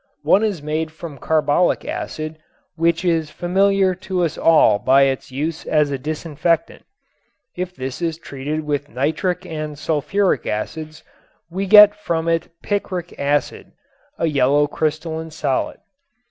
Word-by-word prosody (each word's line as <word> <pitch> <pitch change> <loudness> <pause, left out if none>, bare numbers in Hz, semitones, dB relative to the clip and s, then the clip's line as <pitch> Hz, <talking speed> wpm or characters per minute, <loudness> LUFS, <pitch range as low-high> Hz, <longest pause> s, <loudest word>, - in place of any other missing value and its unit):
One 205 - +4
is 200 -9 -1
made 155 +1 -2
from 155 -3 -9
carbolic 155 +3 +1
acid, 155 0 -5 0.4
which 165 +1 +1
is 165 -3 +1
familiar 190 +2 +2
to 185 0 -2
us 160 - -3
all 160 -10 +4
by 135 +5 +5
its 135 0 -1
use 155 +5 -3
as 150 -2 +2
a 135 - -2
disinfectant. 155 +3 -1 0.7
If 180 0 -4
this 130 +4 -5
is 165 -2 -1
treated 150 0 -4
with 145 -1 -2
nitric 160 +7 -1
and 155 -3 -5
sulfuric 165 +7 0
acids 155 +9 -4 0.5
we 195 +3 -2
get 210 +1 +9
from 170 -5 -2
it 165 0 0
picric 185 -4 -3
acid, 145 0 -1 0.4
a - - 0
yellow 145 -1 +3
crystalline 160 +2 -3
solid. 150 -4 -2
160 Hz, 135 wpm, -20 LUFS, 145-175 Hz, 0.7 s, get